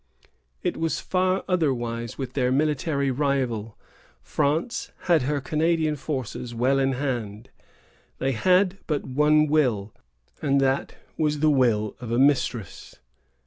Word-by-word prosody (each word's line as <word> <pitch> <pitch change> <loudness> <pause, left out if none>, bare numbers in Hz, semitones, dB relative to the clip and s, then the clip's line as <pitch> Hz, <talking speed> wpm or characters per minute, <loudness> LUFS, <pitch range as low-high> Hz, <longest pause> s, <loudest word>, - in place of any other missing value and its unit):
It - - -1
was 165 0 -1
far 185 +1 0
otherwise 120 - -1
with 135 -2 -5
their 125 -2 +1
military 140 0 +1
rival. 125 -6 -1 0.5
France 155 - -1
had 170 -4 +3
her 145 +3 0
Canadian 155 +1 +1
forces 130 -4 -5
well 130 +4 +2
in 135 0 +2
hand. 120 -6 -4 0.7
They 135 - 0
had 185 - +2
but 150 -3 -1
one 150 +3 +3
will, 125 -10 +1 0.5
and 140 -1 +2
that 135 0 0 0.2
was 150 -1 0
the 155 -1 +4
will 115 -6 +2
of 120 - -7
a 120 - +1
mistress. 125 -7 0
140 Hz, 130 wpm, -25 LUFS, 125-155 Hz, 0.7 s, the